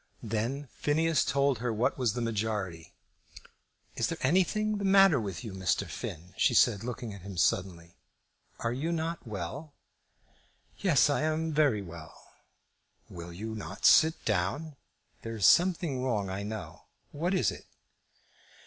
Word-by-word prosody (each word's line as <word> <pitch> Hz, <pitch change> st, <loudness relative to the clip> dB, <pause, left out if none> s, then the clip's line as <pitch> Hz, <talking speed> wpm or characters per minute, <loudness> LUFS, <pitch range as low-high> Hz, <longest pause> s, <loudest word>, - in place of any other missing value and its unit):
Then 115 Hz, +6 st, -2 dB
Phineas 155 Hz, -1 st, +2 dB
told 140 Hz, -2 st, +1 dB
her 120 Hz, 0 st, -1 dB
what 115 Hz, +5 st, 0 dB
was 125 Hz, -5 st, 0 dB
the 120 Hz, 0 st, -3 dB
majority. 105 Hz, -7 st, -3 dB, 1.0 s
"Is -, -, 0 dB
there -, -, -3 dB
anything 205 Hz, +8 st, +1 dB
the -, -, -4 dB
matter 195 Hz, -6 st, +6 dB
with 95 Hz, -6 st, -5 dB
you, 110 Hz, -, -7 dB
Mr. 95 Hz, -2 st, 0 dB
Finn?" 90 Hz, +4 st, -7 dB
she -, -, +3 dB
said, 100 Hz, +1 st, +4 dB
looking 120 Hz, -2 st, -5 dB
at 100 Hz, -, -10 dB
him 95 Hz, 0 st, -9 dB
suddenly. 85 Hz, -3 st, -1 dB, 0.6 s
"Are 115 Hz, 0 st, -1 dB
you 150 Hz, +7 st, -2 dB
not 165 Hz, -3 st, -3 dB
well?" 120 Hz, -, -6 dB, 1.0 s
"Yes; 165 Hz, -9 st, +4 dB
I 145 Hz, -, +1 dB
am 155 Hz, +1 st, -1 dB
very 140 Hz, -9 st, +2 dB
well." 85 Hz, -3 st, -11 dB, 0.9 s
"Will 85 Hz, 0 st, -8 dB
you 110 Hz, +6 st, -6 dB
not 110 Hz, -, -6 dB
sit 160 Hz, +1 st, +5 dB
down? 105 Hz, -, -1 dB, 0.5 s
There 115 Hz, 0 st, -6 dB
is 105 Hz, -4 st, +1 dB
something 170 Hz, -, +3 dB
wrong, 105 Hz, -7 st, -1 dB
I 95 Hz, +1 st, -4 dB
know. 105 Hz, -1 st, -7 dB, 0.3 s
What 175 Hz, +6 st, -1 dB
is -, -, +2 dB
it?" -, -, -11 dB
120 Hz, 150 wpm, -29 LUFS, 100-155 Hz, 1.0 s, matter